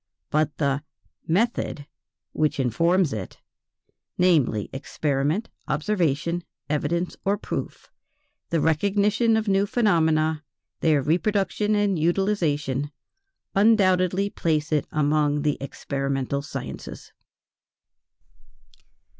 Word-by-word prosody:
But 155 -1 +1
the 140 -1 0 0.5
"method," 180 -5 0 0.5
which 155 -2 0
informs 165 - +2
it 105 -4 -6 0.8
namely, 150 - +3
experiment, 145 - -1 0.2
observation, 170 -1 0 0.2
evidence 155 +4 -1
or 200 +1 +1
proof, - - -6 0.6
the 165 - +1
recognition 205 +8 +2
of 220 0 -2
new 195 +1 +2
phenomena, 160 -8 +2 0.4
their 150 -4 +3
reproduction 205 +6 +1
and 205 -4 +1
utilization, 155 -6 0 0.6
undoubtedly 195 -2 +3
place 155 -2 -1
it 150 -2 +1
among 150 -1 +1
the 150 -2 +1
experimental 140 0 -2
sciences. 65 - -8
160 Hz, 90 wpm, -24 LUFS, 145-195 Hz, 0.8 s, namely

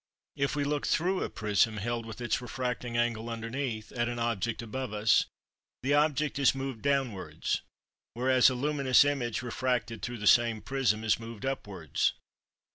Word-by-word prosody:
If 140 0 0
we 145 - 0
look 145 0 -1
through 185 +3 +1
a - - -2
prism, 110 0 +1
held 115 +2 -3
with 110 +2 -8
its 120 0 0
refracting 125 -1 -3
angle 120 -1 0
underneath, 115 0 -4
at 120 -1 -1
an 120 - -4
object 115 -1 -1
above 120 0 -4
us, 105 0 +4 0.6
the 140 +2 +2
object 150 -1 +2
is 135 -1 +4
moved 135 -4 -4
downwards; 135 -9 -1 0.5
whereas 130 +1 +5
a 130 - -2
luminous 140 0 +4
image 120 -6 -1
refracted 120 -3 -1
through 120 0 -4
the 105 - -5
same 115 0 +5
prism 125 -4 0
is 110 0 +2
moved 115 -1 -8
upwards. 100 - -1
120 Hz, 160 wpm, -30 LUFS, 115-135 Hz, 0.6 s, whereas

